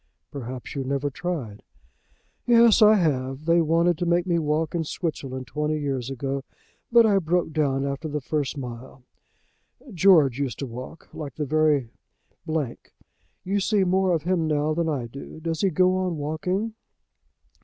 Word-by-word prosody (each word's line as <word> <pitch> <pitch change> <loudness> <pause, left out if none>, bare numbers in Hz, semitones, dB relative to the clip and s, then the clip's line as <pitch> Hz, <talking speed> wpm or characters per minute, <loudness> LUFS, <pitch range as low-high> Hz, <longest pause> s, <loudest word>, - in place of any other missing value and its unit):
"Perhaps 130 -2 -7
you 140 - -3
never 140 +2 -2
tried." 130 -7 -4 0.9
"Yes, 235 -1 +6
I 215 0 +8
have. 135 -5 -1
They 170 +1 +4
wanted 165 +1 +2
to 175 - -1
make 175 +1 +2
me 170 -2 +1
walk 155 0 -1
in 170 -2 0
Switzerland 135 -5 -4
twenty 150 +4 -2
years 135 -4 -2
ago, 135 +1 -3 0.5
but 235 -1 +7
I 200 -3 +4
broke 170 -1 0
down 140 -3 +1
after 140 +3 -3
the 150 0 -2
first 145 +1 -2
mile. 125 0 -8 0.9
George 165 -8 +5
used 140 -3 -2
to 140 - -4
walk 125 +6 -9
like 145 -2 -7
the 150 - -2
very 150 -4 +2 0.6
d. 155 -6 -1 0.7
You 200 +2 0
see 200 0 +2
more 185 0 +2
of 165 -4 0
him 175 -2 0
now 150 0 +1
than 165 0 0
I 135 -6 -2
do. 140 +6 -10
Does 165 0 -3
he 195 - +3
go 185 +2 +3
on 180 -3 -1
walking?" 180 +9 -2
155 Hz, 165 wpm, -25 LUFS, 135-175 Hz, 0.9 s, I